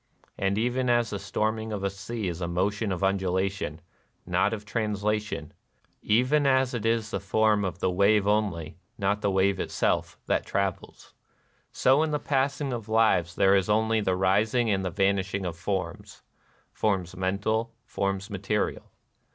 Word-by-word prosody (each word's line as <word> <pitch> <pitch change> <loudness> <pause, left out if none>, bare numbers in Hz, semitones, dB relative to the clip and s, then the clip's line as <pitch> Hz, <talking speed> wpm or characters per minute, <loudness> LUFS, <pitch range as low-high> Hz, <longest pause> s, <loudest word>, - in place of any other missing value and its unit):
And 95 +1 0
even 125 +3 0
as 120 -1 +2
the 100 - -3
storming 110 +3 -2
of 100 -2 -4
a 100 - 0
sea 100 +2 -5
is 85 0 -4
a 85 - -1
motion 100 +4 -1
of 95 +1 -3
undulation, 95 -4 -1 0.4
not - - +1
of 105 -2 -5
translation, 105 -1 -2 0.3
— - - -39
even 130 +7 +3
as 130 -1 +3
it 115 -2 -1
is 115 -1 0
the - - -1
form 105 +1 +2
of 90 -3 -3
the 90 +1 0
wave 100 +2 +3
only, 95 -6 -1 0.2
not 100 -1 0
the 100 - +1
wave 95 0 +2
itself, - - -1
that - - +1
travels, 100 -2 -3 0.3
— - - -40 0.3
so 135 +3 +3
in 160 - +1
the 150 - 0
pass 140 -1 0
ing 140 -3 -2
of 115 -3 -6
lives 110 -6 +2
there 95 0 +4
is 95 +1 +1
only 110 +1 +2
the 95 -3 +1
rising 105 +5 +2
and 95 -1 0
the 90 - -1
222 95 +3 -1
NIRVANA 100 +1 +4
vanishing 95 0 -3
of 85 -2 -3
forms, 90 -1 -4 0.2
— - - -36
forms 95 -5 -1
mental, 110 +5 -1
forms 100 +2 -2
material. 100 +2 -2
100 Hz, 180 wpm, -27 LUFS, 95-110 Hz, 0.4 s, there